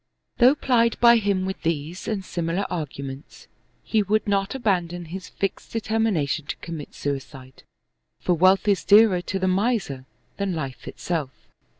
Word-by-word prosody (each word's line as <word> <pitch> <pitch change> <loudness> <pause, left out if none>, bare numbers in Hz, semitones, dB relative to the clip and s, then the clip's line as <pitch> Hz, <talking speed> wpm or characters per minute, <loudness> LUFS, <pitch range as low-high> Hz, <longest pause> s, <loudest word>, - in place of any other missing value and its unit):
Though 255 +3 +6
plied 235 -5 +2
by 235 0 +7
him 200 -3 0
with 190 0 -4
these 165 +1 -3
and 205 -4 -2
similar 175 +3 -2
arguments, 140 -3 -6 0.4
he 220 - +1
would 210 +2 0
not 200 +2 0
abandon 175 -8 -1
his 180 +2 -8
fixed 195 - -4
deter 225 0 -1
mination 160 -9 0
to - - -3
commit 165 -4 -8
suicide, 135 -2 -6 0.6
for 180 - +1
wealth 185 +4 +4
is 200 -2 +2
dearer 205 -3 +6
to 195 - -3
the 190 0 0
miser 185 - 0 0.3
than 200 -3 -1
life 135 -5 -6
itself. 160 -6 -3
185 Hz, 155 wpm, -24 LUFS, 160-210 Hz, 0.6 s, by